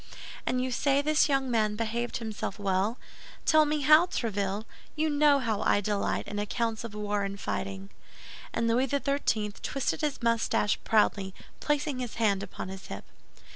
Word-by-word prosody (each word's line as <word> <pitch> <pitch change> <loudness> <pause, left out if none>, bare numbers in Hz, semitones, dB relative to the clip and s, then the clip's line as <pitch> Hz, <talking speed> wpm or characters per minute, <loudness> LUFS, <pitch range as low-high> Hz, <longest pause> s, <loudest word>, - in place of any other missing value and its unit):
"And 250 0 +1
you 260 - -2
say 275 +3 +2
this 305 0 +3
young 270 -2 +1
man 215 -2 +1
behaved 230 +2 -2
himself 220 -3 -4
well? 200 +3 0 0.5
Tell 310 -1 +5
me 300 0 0
how, 305 +5 +6
Tréville—you 215 - -3
know 290 -1 +5
how 225 -6 -1
I - - +3
delight 205 0 -1
in 205 - -4
accounts 225 +2 -2
of 225 -3 -7
war 210 -1 -1
and 200 0 -4
fighting." 195 -1 -4 0.6
And 230 - 0
Louis 245 +4 +2
XIII. 275 -6 0
twisted 275 +3 -2
his 295 -5 -2
mustache 230 -2 +1
proudly, 200 -3 +2 0.2
placing 295 -2 -1
his 245 -3 -4
hand 205 -4 +2
upon 190 -1 -6
his 190 0 -8
hip. - - -7
230 Hz, 160 wpm, -29 LUFS, 205-275 Hz, 0.6 s, how